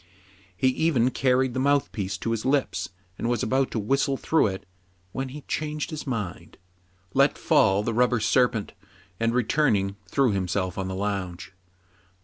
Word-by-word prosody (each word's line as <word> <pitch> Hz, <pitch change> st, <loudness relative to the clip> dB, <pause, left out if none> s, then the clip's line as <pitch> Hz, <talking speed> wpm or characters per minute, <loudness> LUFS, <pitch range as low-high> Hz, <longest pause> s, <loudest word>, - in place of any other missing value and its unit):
He 130 Hz, -, +3 dB
even 130 Hz, -3 st, +2 dB
carried 130 Hz, -1 st, +2 dB
the 130 Hz, -, -2 dB
mouth 140 Hz, +1 st, +2 dB
piece 100 Hz, -1 st, -3 dB
to 115 Hz, -, -3 dB
his 115 Hz, -1 st, -1 dB
lips, 135 Hz, 0 st, 0 dB, 0.3 s
and 115 Hz, -, -1 dB
was 120 Hz, -3 st, 0 dB
about 130 Hz, +4 st, +1 dB
to -, -, -4 dB
whistle 135 Hz, +5 st, +1 dB
through 160 Hz, -4 st, +2 dB
it, 95 Hz, 0 st, -5 dB, 0.5 s
when 135 Hz, +5 st, -4 dB
he 145 Hz, +3 st, -8 dB
changed 150 Hz, +2 st, -3 dB
his 155 Hz, -2 st, -6 dB
mind, 105 Hz, -8 st, -5 dB, 0.6 s
let 140 Hz, +1 st, +3 dB
fall 100 Hz, -1 st, +3 dB
the 115 Hz, -, -1 dB
rubber 125 Hz, +1 st, +3 dB
serpent, 120 Hz, -2 st, +1 dB, 0.5 s
and, 115 Hz, 0 st, +2 dB
returning, 110 Hz, -5 st, +1 dB
threw 135 Hz, -4 st, +2 dB
himself 95 Hz, -1 st, -1 dB
on 95 Hz, -, -2 dB
the 95 Hz, -, -4 dB
lounge. 95 Hz, -2 st, -4 dB
120 Hz, 160 wpm, -25 LUFS, 100-135 Hz, 0.6 s, He